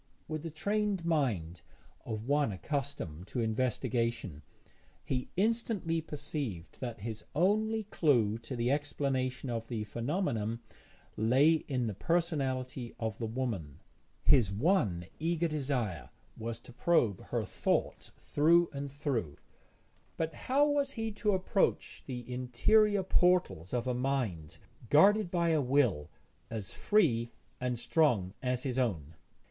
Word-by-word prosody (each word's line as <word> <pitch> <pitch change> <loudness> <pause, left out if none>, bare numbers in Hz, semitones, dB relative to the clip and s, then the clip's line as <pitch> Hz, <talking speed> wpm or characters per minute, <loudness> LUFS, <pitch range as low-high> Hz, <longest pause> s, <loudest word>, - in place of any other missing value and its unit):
With 155 -1 -3
the 165 - -5
trained 200 +2 -1
mind 110 - 0 0.4
of 110 0 -4
one 145 -3 +2
accustomed 100 - -4
to 125 - -4
investigation, 115 - -1 0.6
he 125 -1 -2
instantly 205 -6 +1
perceived 145 - -5
that 120 -4 -5
his 110 0 -5
only 215 +6 +2
clue 120 - +2
to 115 +3 -6
the 120 +1 +1
explanation 135 -3 -1
of 115 -1 -3
the 110 -3 -3
phenomenon 115 - -2 0.6
lay 130 +8 +4 0.2
in 130 -4 0
the 110 - -2
personality 130 - -1
of 110 -3 -3
the 115 - -2
woman. 110 - -3 0.4
His 125 -9 +5
one 105 - +1
eager 170 +1 +1
desire 130 - -2 0.3
was 115 0 -4
to 125 - -13
probe 120 - +2
her - - -1
thought - - -1
through 170 +3 +3
and 140 0 -5
through, 125 - -2 0.8
but 160 -1 -1
how 275 - +2
was 285 -1 +1
he 225 -1 -3
to 210 0 0
approach 190 +2 0
the 125 -3 -5
interior 190 - +3
portals 180 - +2
of 120 -1 -1
a 125 - 0
mind 125 - -2 0.3
guarded 200 +6 +5
by 170 -1 +1
a 160 -2 +3
will 125 - +2 0.4
as 110 -4 -5
free 125 - +2 0.3
and 125 -1 -1
strong 120 - +2
as 125 -1 -1
his 130 -1 -1
own? 85 - -1
130 Hz, 130 wpm, -32 LUFS, 115-165 Hz, 0.8 s, His